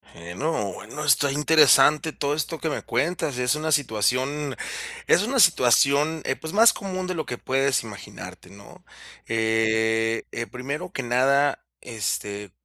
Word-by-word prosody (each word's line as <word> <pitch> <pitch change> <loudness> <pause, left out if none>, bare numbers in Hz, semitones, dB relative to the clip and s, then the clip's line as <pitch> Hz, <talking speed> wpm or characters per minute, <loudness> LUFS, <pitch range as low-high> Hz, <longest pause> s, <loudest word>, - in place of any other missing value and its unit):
Eh, 85 +1 -10
no, 145 - -2 0.2
no. 150 +4 -6
Está 140 0 +3
interesante 150 +1 +4
todo 145 0 -2
esto 155 +2 -4
que 160 - -2
me 145 - -4
cuentas. 145 0 -2
Es 125 +3 +1
una 155 +1 -3
situación 130 - 0 0.5
es 180 - +4
una 260 +3 -1
situación, 150 - +3
eh, 135 - -1
pues 160 +5 -8
más 225 +2 +6
común 185 -2 -5
de 185 - -2
lo 155 - -3
que 125 - -6
puedes 135 -1 0
imaginarte, 105 -3 -11
¿no? 100 0 -16 0.4
Eh, 110 0 0
eh, 115 0 -5
primero 140 +8 -6
que 135 - -5
nada, 135 +4 +1 0.2
este, 105 -3 -4
140 Hz, 150 wpm, -24 LUFS, 115-155 Hz, 0.5 s, más